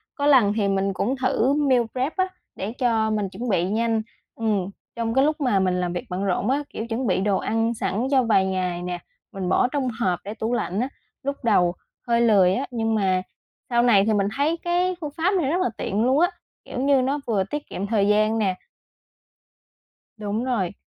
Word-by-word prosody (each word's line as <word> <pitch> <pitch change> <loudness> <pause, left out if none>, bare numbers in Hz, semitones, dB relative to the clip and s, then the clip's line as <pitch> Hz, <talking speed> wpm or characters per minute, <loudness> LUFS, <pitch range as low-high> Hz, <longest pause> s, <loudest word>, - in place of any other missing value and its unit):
Có 285 - -2
lần 250 -8 +5
thì 205 -3 +1
mình 195 0 0
cũng 245 +8 -1
thử 255 +1 +2
meal 275 -4 +3
prep 260 +4 -2
á 375 0 +2 0.3
để 200 +3 -4
cho 225 -3 +2
mình 210 -3 -1
chuẩn 230 +6 -5
bị 180 -3 +2
nhanh. 225 +1 +1 0.3
Ừm, 210 -5 0 0.3
trong 230 -1 -2
cái 265 +1 +4
lúc 310 +1 0
mà 230 -8 +2
mình 180 -1 +1
làm 175 0 -2
việc 175 - -4
bận 185 +2 -2
rộn 195 +4 0
á, 285 +2 +1
kiểu, 225 - -5
chuẩn 235 +1 -2
bị 185 - +1
đồ 200 -1 +2
ăn 225 +1 0
sẵn 215 +4 -1
cho 265 -2 +4
vài 205 -4 +3
ngày 180 -2 -2
nè, 180 0 -4 0.3
mình 190 -2 -4
bỏ - - +3
trong 265 -1 -1
hộp 180 -5 +1
để 205 - -5
tủ 225 +2 -2
lạnh 195 -3 -1
á. 255 - -1 0.3
Lúc 280 +1 -2
đầu 180 -6 +3 0.3
hơi 235 0 +3
lười 195 -6 +5
á 260 +7 -1
nhưng 225 -2 0
mà 190 -3 +2 0.5
sau 235 -1 +3
này 205 -5 +5
thì 220 - +2
mình 200 -1 +2
thấy 310 +4 +1
cái 355 +2 0
phương 300 - -4
pháp 350 +4 +2
này 300 -7 +1
rất 360 - +1
là - - +1
tiện 205 +3 -1
luôn 260 +3 +3
á, 350 +2 +4 0.4
kiểu 250 - -5
như, 275 -1 +3
nó 275 +3 0
vừa 205 -4 +1
tiết 295 +9 -5
kiệm 200 +2 -4
thời 205 -2 +2
gian 215 +2 +3
nè 195 -4 +1 1.6
Đúng 215 +2 -2
rồi. 205 -8 -1
225 Hz, 220 wpm, -24 LUFS, 195-260 Hz, 1.6 s, lần